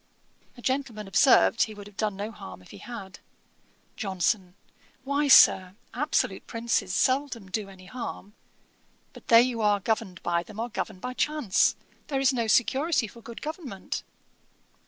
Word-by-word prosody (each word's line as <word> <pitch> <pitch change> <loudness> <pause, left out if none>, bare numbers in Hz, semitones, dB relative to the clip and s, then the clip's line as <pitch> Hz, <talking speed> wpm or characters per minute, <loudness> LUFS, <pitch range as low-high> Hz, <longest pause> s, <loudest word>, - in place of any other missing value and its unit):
A 240 - -13
gentleman 255 -6 -2
observed 220 +3 +4
he 215 - +1
would 205 -1 -10
have 205 -1 -14
done 210 -1 -1
no 205 +3 -5
harm 95 - -11
if - - -16
he - - -11
had. 200 -6 -9 0.8
JOHNSON. 190 -1 -1 0.5
'Why, 280 +2 0
Sir, 185 -8 +7 0.2
absolute 290 -7 -1
princes 230 -4 -1
seldom 255 -2 0
do 205 0 -3
any 185 -1 -14
harm. 210 -1 -7 0.8
But - - -15
they 235 +2 +7
who 230 -2 -4
are 205 -1 +3
governed 200 -3 -2
by 170 0 +1
them 215 +4 -11
are 235 +2 -2
governed 210 -4 -5
by 250 - -4
chance. 295 -8 +2 0.3
There 275 -2 -1
is 270 0 +3
no 235 -3 -1
security 265 +5 +2
for 235 +3 -14
good 235 0 -10
government.' 295 - -5
225 Hz, 155 wpm, -27 LUFS, 195-255 Hz, 0.8 s, Sir